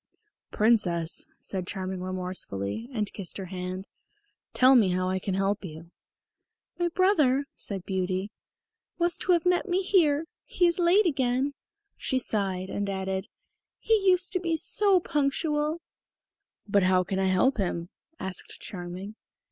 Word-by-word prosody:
"Princess," 180 -7 +1
said 185 -2 -4
Charming 190 -1 -4
remorsefully, 185 - -4
and 215 -5 -2
kissed 190 -5 -4
her 195 - -5
hand, 185 +1 -4 0.7
"tell 255 +1 +6
me 225 -7 +5
how 185 0 0
I 190 0 0
can 190 0 -2
help 195 +2 0
you." 165 -1 -9 0.9
"My 350 - +2
brother," 310 -7 +3
said 195 -3 -3
Beauty, 190 +1 -2 0.7
"was 345 0 +2
to 365 - +3
have 340 -1 +1
met 360 +2 +2
me 370 +2 +1
here. 325 -6 +3 0.2
He 355 - +1
is 345 +2 +2
late 360 +5 +5
again." 270 -2 +1 0.4
She 260 - -1
sighed 195 -6 -1
and 200 0 -2
added, 190 0 -3 0.5
"He 450 - 0
used 370 -4 +3
to 365 - +2
be 335 -2 0
so 390 +4 +3
punctual." 300 +1 0 0.9
"But 200 0 +3
how 185 0 +3
can 190 +1 -2
I 190 - +2
help 190 +9 +3
him?" 175 -3 -2 0.3
asked 190 -1 -5
Charming. 185 +2 -7
205 Hz, 145 wpm, -27 LUFS, -, 0.9 s, tell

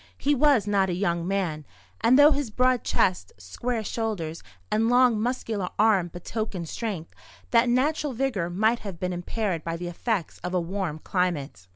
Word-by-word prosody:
He 290 - +1
was 280 -6 +4
not 200 -2 +2
a 175 - -1
young 170 -2 -1
man; 180 -6 -1 0.4
and 250 +3 +6
though 290 +2 +8
his 285 -4 -1
broad 255 +2 +2
chest, 180 - 0
square 220 - -3
shoulders, 200 -8 -3 0.3
and 220 +2 +2
long, 245 -3 +4
muscular 225 -6 -2
arms 200 -5 +3
betokened 180 0 -4
strength, 200 -8 -5 0.4
that 240 0 +4
natural 290 +3 +1
vigour 230 -9 -1
might 220 +6 +2
have 190 -5 -8
been 180 0 -2
impaired 175 -1 -2
by 165 0 -3
the 175 +1 -5
effects 185 0 -2
of 180 +1 -4
a - - +3
warm 175 -2 -3
climate. 155 - -2
200 Hz, 170 wpm, -26 LUFS, 175-240 Hz, 0.4 s, though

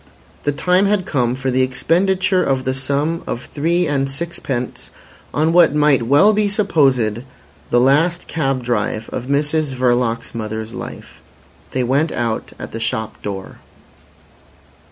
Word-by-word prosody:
The 145 - +2
time 180 +6 +2
had 200 -3 +1
come 125 -3 0
for 130 0 -2
the 130 +1 +2
expenditure 185 +8 +1
of 135 -1 0
the 130 - -1
sum 145 +5 -1
of 120 - -4
three 170 +4 0
and 140 -3 0
sixpence 135 -4 -4 0.4
on 155 +2 +1
what 170 -4 +5
might 145 -6 +3
well 170 - +5
be 210 0 +1
supposed 135 - +2 0.5
the 120 - +3
last 155 +7 +2
cab 135 -5 -1
drive 110 -2 -2
of 125 - -4
Mrs 150 +1 0
Verloc's 120 -2 0
mother's 110 0 -5
life. - - -9 0.5
They 130 - -1
went 140 +6 +1
out 115 -2 -2
at - - -8
the 115 - -5
shop 110 -1 -3
door. 95 -2 -6
135 Hz, 145 wpm, -19 LUFS, 120-165 Hz, 0.5 s, what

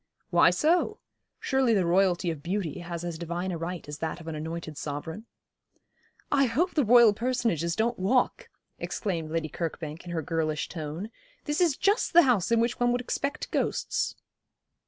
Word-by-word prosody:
'Why - - +6
so? 350 +7 +2 0.4
Surely 265 -4 +2
the 190 -3 +2
Royalty 180 0 +2
of 155 -3 -7
beauty 180 -1 -3
has 170 -1 -6
as 170 -2 -5
divine 175 +2 -3
a 170 - -3
right 170 -1 -5
as 145 0 -7
that 160 +1 -3
of 165 - -12
an 160 - -3
anointed 160 0 -5
sovereign.' 160 +10 -6 1.0
'I 275 -1 +4
hope 320 +11 0
the 295 - +3
Royal 235 -1 +7
personages 230 - 0
don't 230 0 0
walk,' 245 +7 +1 0.3
exclaimed 170 -7 -3
Lady 160 0 -1
Kirkbank, 160 0 -5
in 175 - -10
her 165 -2 -2
girlish 155 -1 -1
tone; 165 +6 -6 0.3
'this 295 +4 -1
is 330 -6 +3
just 405 +1 +1
the 345 +1 +8
house 235 - +2
in 230 - +4
which 235 +1 0
one 245 0 +3
would 245 - +1
expect 280 +4 -3
ghosts.' - - -1
180 Hz, 175 wpm, -28 LUFS, 165-245 Hz, 1.0 s, the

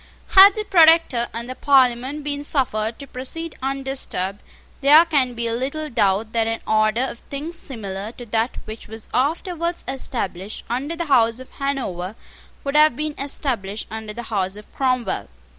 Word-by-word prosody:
Had 390 +1 +9
the 430 - -2
Protector 325 - +5
and 235 +1 -5
the 255 - -4
Parliament 265 +1 +2
been 285 0 -3
suffered 230 -6 0
to 280 - -9
proceed 285 +6 -6
undisturbed, 265 -8 -2 0.4
there 300 +4 +8
can 270 -7 +1
be 235 0 -2
little 280 +6 -3
doubt 210 0 +1
that 225 -1 +1
an 225 0 -2
order 215 +2 +2
of 250 -3 -4
things 300 +5 -6
similar 210 - -5
to 245 - -10
that 225 +2 -1
which 220 +1 -9
was 220 0 -9
afterwards 335 +5 -1
established 215 -7 -3
under 275 +7 -2
the 340 0 -3
House 235 -5 +3
of 260 - -12
Hanover 225 -9 -3 0.5
would 280 +1 -3
have 305 -4 +6
been 305 +2 -3
established 235 -7 -2
under 220 -1 -6
the 235 +3 -7
House 190 -1 -1
of 210 0 -13
Cromwell. 255 - -1
255 Hz, 160 wpm, -22 LUFS, 220-290 Hz, 0.5 s, Had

